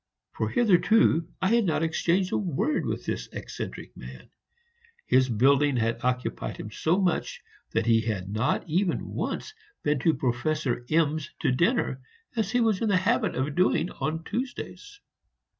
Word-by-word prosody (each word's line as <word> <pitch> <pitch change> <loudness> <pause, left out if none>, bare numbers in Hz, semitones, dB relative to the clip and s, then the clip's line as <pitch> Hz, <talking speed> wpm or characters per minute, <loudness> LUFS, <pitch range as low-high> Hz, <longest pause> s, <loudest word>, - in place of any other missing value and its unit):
For - - -2
hitherto 215 - +3 0.2
I 185 - +3
had 235 -2 +3
not 165 -2 +1
exchanged 175 +3 +1
a - - +1
word 195 - -1
with - - -3
this - - -3
eccentric - - -7
man; - - -11 0.7
his 130 0 +3
building 135 +4 +3
had 115 0 -1
occupied 125 0 -2
him 105 - -7
so 165 - +1
much 180 -4 0 0.3
that 115 0 0
he 115 -1 +4
had 105 -5 -3
not 110 - -1
even 175 +3 0
once 430 - -4 0.3
been 150 -2 +1
to 160 +4 +2
Professor 125 +1 -1
M 155 -1 +2
's 145 - -8
to - - +2
dinner, 140 - +1 0.3
as 220 -4 0
he 245 +3 +2
was 220 -4 +2
in 225 - +1
the 195 - +4
habit 215 +3 +1
of 135 +3 -1
doing 180 0 +2
on 160 +1 -3
Tuesdays. 265 - -5
160 Hz, 160 wpm, -27 LUFS, 130-195 Hz, 0.7 s, he